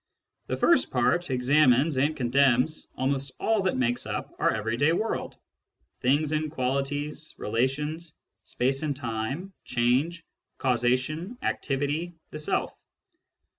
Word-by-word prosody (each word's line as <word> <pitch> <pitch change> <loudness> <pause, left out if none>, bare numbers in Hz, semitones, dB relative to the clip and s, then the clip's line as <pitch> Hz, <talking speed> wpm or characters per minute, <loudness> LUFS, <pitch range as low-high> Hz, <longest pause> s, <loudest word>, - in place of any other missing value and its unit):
The - - -2
first 340 - +4
part 160 +8 +1
examines 135 +2 +4
and 145 +4 +1
condemns 130 +3 +2
almost 135 0 -1
all 220 -2 +2
that 190 -6 0
makes 120 -1 0
up - - -4
our - - +3
everyday 115 +9 +1
world: 220 +6 -2 0.6
things 145 +4 +2
and 155 0 0
qualities, 145 +2 -2
relations, 150 +8 -2 0.3
space 135 +2 0
and 150 -2 -1
time, 130 - -4
change, 130 +8 0 0.3
causation, 130 - 0
activity, 145 +5 -1 0.2
the 155 - -6
self. 150 - -1
140 Hz, 115 wpm, -27 LUFS, 125-155 Hz, 0.6 s, first